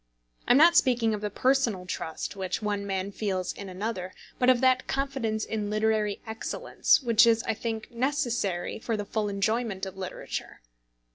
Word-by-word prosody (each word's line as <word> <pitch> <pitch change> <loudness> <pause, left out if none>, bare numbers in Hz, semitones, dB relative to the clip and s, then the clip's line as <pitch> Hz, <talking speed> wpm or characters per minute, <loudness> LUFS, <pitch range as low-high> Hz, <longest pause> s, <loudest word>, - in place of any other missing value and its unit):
I - - +6
am - - +6
not 335 +3 +7
speaking 240 -8 +3
of 210 - -3
the 210 - -2
personal 240 -5 +1
trust 160 +1 -5
which 190 -2 -2
one 205 -2 -2
man 195 0 -2
feels 190 -3 -2
in 200 -1 -8
another, 185 -1 -4 0.2
but 250 - +4
of 255 -2 +5
that 260 0 +3
confidence 265 -6 -1
in 210 -2 -3
literary 215 -1 0
excellence, 225 +4 +1
which 235 -1 +5
is, 230 -1 +3
I 225 - 0
think, 220 0 -5
necessary 240 -9 -1
for 225 0 -2
the 205 - -3
full 210 0 -1
enjoyment 200 0 -1
of 190 0 -8
literature. 185 -1 -6
220 Hz, 170 wpm, -27 LUFS, 200-240 Hz, 0.2 s, not